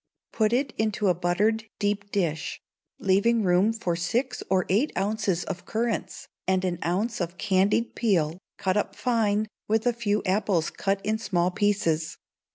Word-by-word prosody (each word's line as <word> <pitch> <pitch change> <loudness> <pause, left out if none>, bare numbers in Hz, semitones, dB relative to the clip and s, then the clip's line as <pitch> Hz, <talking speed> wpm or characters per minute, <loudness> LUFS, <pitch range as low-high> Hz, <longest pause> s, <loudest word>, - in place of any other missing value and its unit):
Put 215 -1 +2
it 260 +1 +1
into 215 -2 +1
a - - +5
buttered 200 +6 +1
deep 205 -1 -1
dish, 165 -6 -1 0.4
leaving 205 +4 +3
room 185 +3 +4
for 200 -7 -2
six 230 +10 -1
or 185 -2 +2
eight 215 +11 +2
ounces 200 -3 0
of 185 -2 -6
currants, 225 0 -2 0.2
and 190 0 +2
an 175 -2 -1
ounce 200 +6 -1
of 175 +1 -3
candied 200 +6 +2
peel, 175 -7 +1 0.2
cut 190 +1 0
up 210 - -1
fine, 215 -3 +1 0.2
with 220 +2 +1
a 245 - +3
few 210 -3 0
apples 185 -3 +1
cut 195 0 -1
in 220 +1 0
small 180 -4 +1
pieces. 185 -6 0
200 Hz, 160 wpm, -26 LUFS, 180-220 Hz, 0.4 s, a